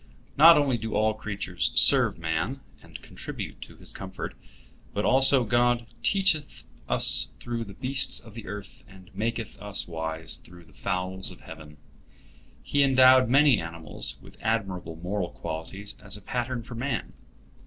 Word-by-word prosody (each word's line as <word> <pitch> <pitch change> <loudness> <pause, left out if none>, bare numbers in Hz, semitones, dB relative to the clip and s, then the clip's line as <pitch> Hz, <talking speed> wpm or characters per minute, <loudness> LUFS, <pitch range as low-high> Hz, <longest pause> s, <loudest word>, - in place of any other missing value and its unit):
Not 165 +3 +8
only 135 -5 +1
do 110 +1 -5
all 110 0 +2
creatures 100 -4 -3
serve - - +6
man, 85 +11 -3 0.2
and - - -12
contribute - - -8
to - - -11
his - - -11
comfort, 95 -1 -7 0.6
but 105 - -1
also 135 0 +5
God 120 +1 +1 0.2
"teacheth 160 - 0 0.3
us 70 +2 +6
through 120 -1 -5
the 100 -2 -12
beasts 130 +1 +2
of 110 - -15
the 115 -1 -10
earth, 105 0 -9
and 95 -2 -17
maketh 115 0 -4
us 105 -1 -1
wise 80 -1 -4
through 90 0 -15
the 75 - -22
fowls 95 +6 -3
of - - -12
heaven." 75 -2 -12 0.9
He 145 - 0
endowed 130 -2 +5
many 140 -2 +4
animals 85 -1 -5
with - - -16
admirable 95 -7 -2
moral 90 +2 -4
qualities 95 +6 -6
as 100 0 -2
a - - -12
pattern 125 -1 -3
for 120 - -10
man. 120 -2 -4
105 Hz, 155 wpm, -26 LUFS, 90-125 Hz, 0.9 s, Not